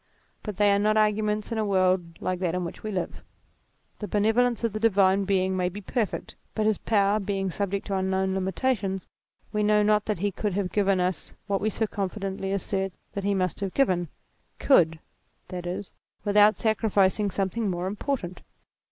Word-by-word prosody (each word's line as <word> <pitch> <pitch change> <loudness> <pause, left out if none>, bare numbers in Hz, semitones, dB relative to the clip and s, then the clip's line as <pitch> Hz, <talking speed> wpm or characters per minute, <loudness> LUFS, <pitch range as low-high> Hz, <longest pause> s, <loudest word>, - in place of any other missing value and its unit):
But 210 -4 -6
they 205 -1 +4
are 200 - +3
not 215 +1 +2
arguments 215 0 +1
in 225 - -1
a - - +1
world 185 -4 +1
like 185 -1 -2
that 180 -2 -1
in 180 -1 -1
which 170 - -7
we 215 - -4
live. 185 -4 -4 0.8
The 210 - -4
benevolence 225 +4 +2
of 230 -3 0
the 215 - -3
divine 200 -3 +3
Being 190 -1 +1
may 180 -1 +1
be 195 +3 -7
perfect, 210 +1 -3 0.2
but 215 - 0
his 215 -2 +2
power 205 -1 +2
being 195 -2 -2
subject 200 +1 -2
to 200 - -2
unknown 190 0 0
limitations, 190 0 -1 0.5
we 210 - +1
know 210 0 +4
not 210 0 +3
that 210 - -1
he 200 +3 -1
could 205 +1 -2
have 195 -1 -1
given 200 -2 +2
us 180 0 -2
what 200 -2 -1
we 215 - +1
so 220 +1 -1
confidently 195 -1 -3
assert 195 -1 -1 0.2
that 200 - -4
he 200 0 +1
must 185 -2 -1
have 195 -3 -4
given; 185 -11 +2 0.5
could 165 - +4 0.5
(that 180 -1 -5
is) 185 +2 -5 0.3
with 205 0 0
out 210 +1 +6
sacrificing 210 -2 +2
something 195 +3 -1
more 175 0 -2
important. 200 -2 -3
200 Hz, 185 wpm, -26 LUFS, 190-210 Hz, 0.8 s, out